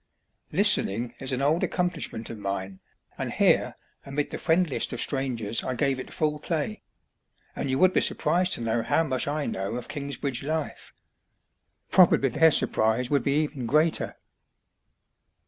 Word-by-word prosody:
Listening 115 Hz, +5 st, +2 dB
is 135 Hz, 0 st, -3 dB
an 130 Hz, +1 st, -1 dB
old 155 Hz, +4 st, +2 dB
accomplishment 170 Hz, -11 st, -2 dB
of 115 Hz, -, -8 dB
mine, 95 Hz, -1 st, -4 dB, 0.4 s
and -, -, -3 dB
here, -, -, +2 dB, 0.3 s
amid 140 Hz, +1 st, -3 dB
the -, -, -5 dB
friendliest 165 Hz, -3 st, +1 dB
of -, -, -4 dB
strangers, 120 Hz, -6 st, -2 dB
I 130 Hz, -, -2 dB
gave 135 Hz, +1 st, 0 dB
it -, -, -8 dB
full 150 Hz, -1 st, -1 dB
play; 165 Hz, +7 st, -3 dB, 0.7 s
and 140 Hz, -, -3 dB
you 130 Hz, -, +1 dB
would 185 Hz, +4 st, +4 dB
be -, -, +3 dB
surprised 180 Hz, +1 st, +1 dB
to -, -, -3 dB
know 115 Hz, 0 st, 0 dB
how 165 Hz, -, +2 dB
much 130 Hz, -4 st, -2 dB
I 145 Hz, 0 st, -1 dB
know 95 Hz, +4 st, -3 dB
of 125 Hz, -1 st, -5 dB
Kingsbridge 140 Hz, -2 st, -4 dB
life. 155 Hz, +2 st, -4 dB, 1.0 s
Probably 170 Hz, -7 st, +5 dB
their 160 Hz, +7 st, +5 dB
surprise 120 Hz, -3 st, +1 dB
would 140 Hz, -2 st, +3 dB
be 140 Hz, +5 st, +1 dB
even 140 Hz, -5 st, -5 dB
greater. 155 Hz, +6 st, +1 dB
140 Hz, 155 wpm, -26 LUFS, 120-155 Hz, 1.0 s, Probably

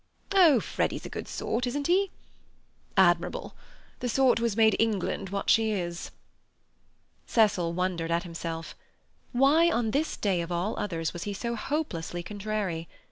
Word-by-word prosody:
"Oh, 335 Hz, -10 st, +6 dB
Freddy's -, -, -2 dB
a -, -, -5 dB
good -, -, -6 dB
sort, 245 Hz, +2 st, -2 dB
isn't 285 Hz, +3 st, -2 dB
he?" 380 Hz, +4 st, +3 dB, 0.9 s
"Admirable. -, -, +2 dB, 0.5 s
The 245 Hz, -, -2 dB
sort 260 Hz, 0 st, +3 dB
who 235 Hz, -, 0 dB
has 225 Hz, -2 st, -1 dB
made 220 Hz, -2 st, +5 dB
England 205 Hz, -3 st, 0 dB
what 200 Hz, +1 st, -3 dB
she 225 Hz, -1 st, +4 dB
is." 175 Hz, -4 st, -3 dB, 1.2 s
Cecil 205 Hz, -7 st, +3 dB
wondered 175 Hz, -2 st, -1 dB
at 170 Hz, +1 st, +1 dB
himself. 165 Hz, -2 st, -6 dB, 0.6 s
Why, 285 Hz, +7 st, +5 dB
on 235 Hz, -9 st, 0 dB
this 300 Hz, +5 st, -1 dB
day 190 Hz, -4 st, +1 dB
of 170 Hz, +1 st, -5 dB
all 175 Hz, +5 st, -1 dB
others, 165 Hz, -5 st, -2 dB
was 175 Hz, -, -6 dB
he 205 Hz, -1 st, -3 dB
so 235 Hz, +4 st, -3 dB
hopelessly 210 Hz, -, -3 dB
contrary? 200 Hz, -4 st, -3 dB
210 Hz, 150 wpm, -28 LUFS, 175-245 Hz, 1.2 s, Oh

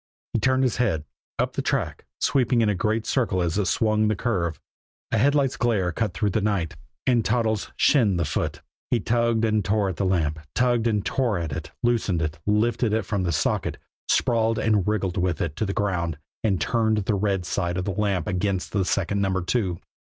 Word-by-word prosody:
_ -, -, -, 0.3 s
He -, -, +1 dB
turned 130 Hz, +3 st, +2 dB
his 125 Hz, -4 st, +1 dB
head. 95 Hz, -11 st, 0 dB, 0.3 s
Up -, -, 0 dB
the -, -, -1 dB
track, -, -, -2 dB
sweeping 125 Hz, -3 st, +2 dB
in 110 Hz, -, +3 dB
a -, -, +2 dB
great 110 Hz, +4 st, 0 dB
circle 115 Hz, -8 st, +1 dB
as 85 Hz, +2 st, 0 dB
it 100 Hz, -, 0 dB
swung 110 Hz, -1 st, +2 dB
the 110 Hz, -, +1 dB
curve, 90 Hz, -, -1 dB, 0.5 s
a -, -, +2 dB
headlight's 140 Hz, +1 st, +2 dB
glare 105 Hz, -7 st, +1 dB
cut 105 Hz, 0 st, -2 dB
through 100 Hz, +5 st, 0 dB
the 110 Hz, -, 0 dB
night 100 Hz, -6 st, -1 dB, 0.3 s
and 120 Hz, -3 st, +3 dB
Toddles 110 Hz, -1 st, 0 dB
"shinned" 110 Hz, -, +4 dB
the 85 Hz, -, +1 dB
foot. -, -, -2 dB, 0.3 s
He 120 Hz, -, +2 dB
tugged 115 Hz, +1 st, +1 dB
and 110 Hz, -2 st, +1 dB
tore 100 Hz, +1 st, +1 dB
at 95 Hz, -, -5 dB
the 100 Hz, -, 0 dB
lamp, 80 Hz, -4 st, 0 dB, 0.2 s
tugged 120 Hz, -2 st, +2 dB
and 105 Hz, -3 st, 0 dB
tore 120 Hz, -7 st, 0 dB
at 80 Hz, -3 st, -3 dB
it, 80 Hz, +1 st, -5 dB
loosened 110 Hz, -8 st, +1 dB
it, 75 Hz, 0 st, -3 dB
lifted 110 Hz, +1 st, +2 dB
it 110 Hz, -3 st, 0 dB
from 100 Hz, -1 st, -1 dB
its 85 Hz, -2 st, +1 dB
socket, -, -, -1 dB, 0.3 s
sprawled 115 Hz, -2 st, +2 dB
and 110 Hz, -4 st, +2 dB
wriggled 100 Hz, -4 st, 0 dB
with 90 Hz, -3 st, 0 dB
it 75 Hz, -3 st, -2 dB
to 110 Hz, -, -1 dB
the -, -, -1 dB
ground 90 Hz, -6 st, -1 dB, 0.3 s
and 100 Hz, -5 st, +1 dB
turned 110 Hz, -2 st, +1 dB
the 110 Hz, -, +1 dB
red 100 Hz, -2 st, 0 dB
side 85 Hz, +1 st, -1 dB
of 90 Hz, -, -2 dB
the 100 Hz, -, -1 dB
lamp 100 Hz, -2 st, 0 dB
against 95 Hz, -1 st, -1 dB
second 100 Hz, +2 st, 0 dB
Number 95 Hz, -2 st, 0 dB
Two. 95 Hz, -3 st, 0 dB
105 Hz, 205 wpm, -25 LUFS, 90-115 Hz, 0.5 s, shinned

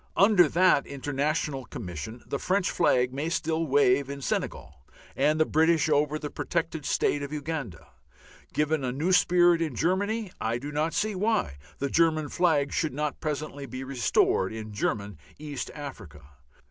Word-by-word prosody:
Under 195 Hz, -5 st, +6 dB
that 180 Hz, -3 st, +3 dB
international 140 Hz, 0 st, -2 dB
Commission 105 Hz, +5 st, -7 dB
the 140 Hz, -, -3 dB
French 190 Hz, 0 st, 0 dB
flag 125 Hz, -6 st, +2 dB
may 145 Hz, +4 st, -2 dB
still 165 Hz, 0 st, -1 dB
wave 140 Hz, -1 st, +3 dB
in 140 Hz, 0 st, -5 dB
Senegal 75 Hz, -, -4 dB, 0.3 s
and 150 Hz, +3 st, +2 dB
the 155 Hz, -, +4 dB
British 160 Hz, 0 st, +3 dB
over 150 Hz, 0 st, +2 dB
the 150 Hz, -1 st, -6 dB
protected 160 Hz, -3 st, -3 dB
State 145 Hz, -, +1 dB
of 140 Hz, 0 st, -5 dB
Uganda. 145 Hz, -, -5 dB, 0.6 s
Given 150 Hz, -1 st, 0 dB
a 125 Hz, -, -1 dB
new 155 Hz, +8 st, -1 dB
spirit 175 Hz, -2 st, +4 dB
in 155 Hz, -6 st, -2 dB
Germany 200 Hz, -, 0 dB
I 115 Hz, +1 st, 0 dB
do 140 Hz, +4 st, -6 dB
not 155 Hz, +3 st, -1 dB
see 210 Hz, +1 st, 0 dB
why 200 Hz, -, 0 dB, 0.2 s
the 140 Hz, -, -2 dB
German 155 Hz, -2 st, +2 dB
flag 155 Hz, -6 st, +1 dB
should 155 Hz, -6 st, -1 dB
not 150 Hz, -1 st, -2 dB
presently 150 Hz, -2 st, -4 dB
be 130 Hz, +2 st, -6 dB
restored 125 Hz, -7 st, +1 dB
in 110 Hz, -1 st, -7 dB
German 100 Hz, -3 st, -2 dB, 0.2 s
East 145 Hz, -2 st, -5 dB
Africa. 105 Hz, -, -9 dB
150 Hz, 160 wpm, -27 LUFS, 130-165 Hz, 0.6 s, Under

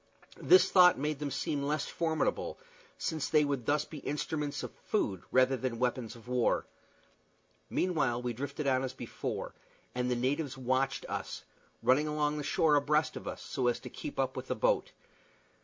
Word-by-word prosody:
This 370 Hz, -, +6 dB
thought 180 Hz, -1 st, +7 dB
made 150 Hz, +1 st, -2 dB
them 145 Hz, -1 st, -2 dB
seem 140 Hz, +1 st, -2 dB
less 145 Hz, +1 st, 0 dB
formidable, 160 Hz, -2 st, -1 dB, 0.4 s
since 160 Hz, -4 st, -2 dB
they 150 Hz, -1 st, +4 dB
would 140 Hz, -5 st, -2 dB
thus 150 Hz, 0 st, +2 dB
be 155 Hz, -, -8 dB
instruments 150 Hz, 0 st, -3 dB
of -, -, -5 dB
food 95 Hz, -3 st, -1 dB
rather 130 Hz, +1 st, +4 dB
than 130 Hz, -2 st, -3 dB
weapons 125 Hz, -1 st, -1 dB
of 115 Hz, 0 st, -15 dB
war. 125 Hz, -1 st, +1 dB, 1.0 s
Meanwhile 150 Hz, -10 st, +1 dB
we 120 Hz, -1 st, -1 dB
drifted 140 Hz, +4 st, -4 dB
on 130 Hz, -1 st, +3 dB
as 130 Hz, -, -3 dB
before, -, -, -5 dB, 0.4 s
and 125 Hz, 0 st, -1 dB
the 125 Hz, -, +1 dB
natives 135 Hz, +3 st, -1 dB
watched 130 Hz, +1 st, 0 dB
us, -, -, -4 dB, 0.4 s
running 145 Hz, +4 st, +4 dB
along 150 Hz, 0 st, 0 dB
the -, -, -3 dB
shore 150 Hz, +1 st, +3 dB
abreast 150 Hz, +2 st, +2 dB
of -, -, -7 dB
us, -, -, -5 dB
so 130 Hz, -3 st, -1 dB
as 120 Hz, -, +1 dB
to 125 Hz, -, -9 dB
keep -, -, -7 dB
up 135 Hz, 0 st, 0 dB
with -, -, -5 dB
the -, -, -1 dB
boat. -, -, +1 dB
140 Hz, 175 wpm, -31 LUFS, 125-150 Hz, 1.0 s, thought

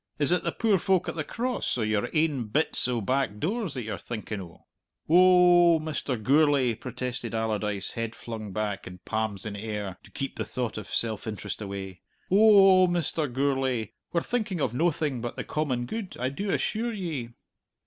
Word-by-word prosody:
"Is 145 Hz, 0 st, +4 dB
it 180 Hz, -, +3 dB
the -, -, 0 dB
poor 215 Hz, -5 st, +2 dB
folk 185 Hz, 0 st, +1 dB
at -, -, -3 dB
the 155 Hz, -, -2 dB
Cross, 245 Hz, -, -2 dB
or 115 Hz, -, 0 dB
your 105 Hz, -1 st, 0 dB
ain 155 Hz, -6 st, +1 dB
bits 140 Hz, +4 st, +2 dB
o' 120 Hz, -2 st, -1 dB
back 130 Hz, -1 st, 0 dB
doors 195 Hz, -, -2 dB
that 125 Hz, -, -3 dB
you're 110 Hz, -, -5 dB
thinking 110 Hz, -3 st, -5 dB
o'?" 85 Hz, -2 st, -13 dB, 0.4 s
"Oh 175 Hz, 0 st, +6 dB
oh, -, -, 0 dB
Mr. 150 Hz, -5 st, -3 dB
Gourlay!" 140 Hz, 0 st, +3 dB
protested 125 Hz, -1 st, -4 dB
Allardyce, 105 Hz, -3 st, -1 dB
head 115 Hz, -1 st, -4 dB
flung 110 Hz, -3 st, -7 dB
back, 105 Hz, 0 st, -3 dB
and 90 Hz, -1 st, -11 dB
palms 110 Hz, -2 st, -2 dB
in 105 Hz, -1 st, -4 dB
air, 105 Hz, -3 st, -4 dB
to -, -, -17 dB
keep 135 Hz, -, -5 dB
the -, -, -1 dB
thought 120 Hz, -4 st, -3 dB
of 105 Hz, -, -9 dB
self 110 Hz, -1 st, -1 dB
interest 105 Hz, -1 st, -5 dB
away, 95 Hz, -3 st, -6 dB, 0.3 s
"oh 195 Hz, -2 st, +7 dB
oh, -, -, +1 dB
Mr. 165 Hz, -4 st, -1 dB
Gourlay! 130 Hz, -4 st, 0 dB, 0.2 s
We're 170 Hz, -, +1 dB
thinking 215 Hz, -6 st, -2 dB
of 130 Hz, -5 st, 0 dB
noathing 150 Hz, -3 st, 0 dB
but 120 Hz, 0 st, -4 dB
the -, -, -4 dB
common 130 Hz, -6 st, -1 dB
good, 205 Hz, -, -5 dB
I 125 Hz, +1 st, 0 dB
do 195 Hz, +9 st, -4 dB
assure 225 Hz, +4 st, 0 dB
ye." 155 Hz, -, -4 dB
130 Hz, 190 wpm, -27 LUFS, 110-170 Hz, 0.4 s, oh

